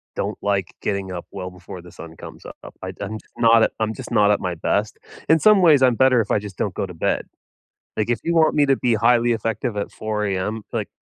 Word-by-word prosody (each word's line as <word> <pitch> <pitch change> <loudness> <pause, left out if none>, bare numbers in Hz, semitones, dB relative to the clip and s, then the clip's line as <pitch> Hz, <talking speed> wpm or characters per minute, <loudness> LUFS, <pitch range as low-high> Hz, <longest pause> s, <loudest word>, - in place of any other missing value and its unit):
Don't - - -3
like 100 -3 -1
getting 100 -2 -3
up 90 -1 -6
well 90 -1 -6
before 90 0 -11
the 90 -1 -14
sun 80 -1 -11
comes - - -11
up. - - -11
I - - -5
do - - -9
I'm 110 +2 -5 0.2
not 115 -1 +5
I'm 110 0 -1
just 125 0 -9
not 105 -2 +4
at 105 - +2
my 90 -2 -3
best. 105 +6 -1 0.3
In 160 0 +5
some 210 0 +5
ways, 155 -6 +6
I'm 125 -2 +4
better 130 -2 +4
if 105 - -4
I - - +3
just 100 -2 -10
don't 100 - -2
go - - -2
to 90 - -9
bed, 80 - -1 0.7
like 110 +2 -1
if 120 - 0
you 170 0 -1
want 160 -1 +4
me 145 -1 +4
to 135 - +4
be 120 -2 +1
highly 120 +2 +3
effective 115 +1 -3
at 100 - -3
4 105 -1 -3
am, 100 +3 -2
like, - - -2
110 Hz, 245 wpm, -21 LUFS, 95-120 Hz, 0.7 s, ways